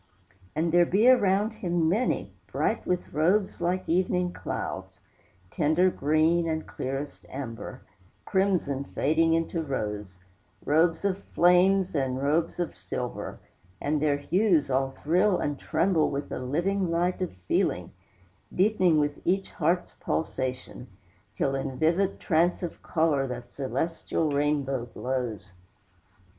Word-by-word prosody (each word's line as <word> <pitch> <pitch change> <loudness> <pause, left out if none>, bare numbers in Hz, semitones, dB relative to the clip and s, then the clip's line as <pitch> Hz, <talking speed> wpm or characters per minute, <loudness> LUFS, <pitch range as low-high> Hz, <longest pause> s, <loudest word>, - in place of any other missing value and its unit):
And 160 +2 +1
there 175 +1 +6
be 210 +6 +3
around 210 -4 +4
him 175 -6 0
many, 210 +10 0
Bright - - -1
with 180 -1 -2
robes 185 +7 +1
like 180 +2 -1
evening 180 +1 +1
clouds, 95 +1 -5 0.5
Tender 165 +4 +3
green 160 +3 +2
and 160 0 -2
clearest 135 +2 -5
amber, 130 -1 -7 0.4
Crimson 185 -8 +1
fading 160 +4 +2
into 165 0 -1
rose, 105 - -4 0.5
Robes 165 +4 +2
of 195 -1 0 0.2
flames 180 +2 +4
and 130 -3 -1
robes 155 +5 0
of 175 - -2
silver, - - -5 0.4
And 150 0 0
their 145 -2 +2
hues 170 -1 +2
all 135 +1 +1
thrill 180 +8 +2
and 145 -1 -2
tremble 170 -4 +1
With 140 +1 -4
a - - -3
living 175 +9 0
light 175 +2 0
of 185 - -2
feeling, - - 0 0.6
Deepening 185 -4 +3
with 145 0 -1
each 190 +2 0
heart's 175 +1 0
pulsation, 130 -4 -3 0.5
Till 135 +6 0
in 135 -1 -3
vivid 175 +6 +1
trance 175 +2 +1
of 175 - -5
color 155 -5 +1
That 120 -1 -7
celestial 160 +2 -2
rainbow 140 -3 0
glows. 120 -5 -4
160 Hz, 125 wpm, -27 LUFS, 140-180 Hz, 0.6 s, there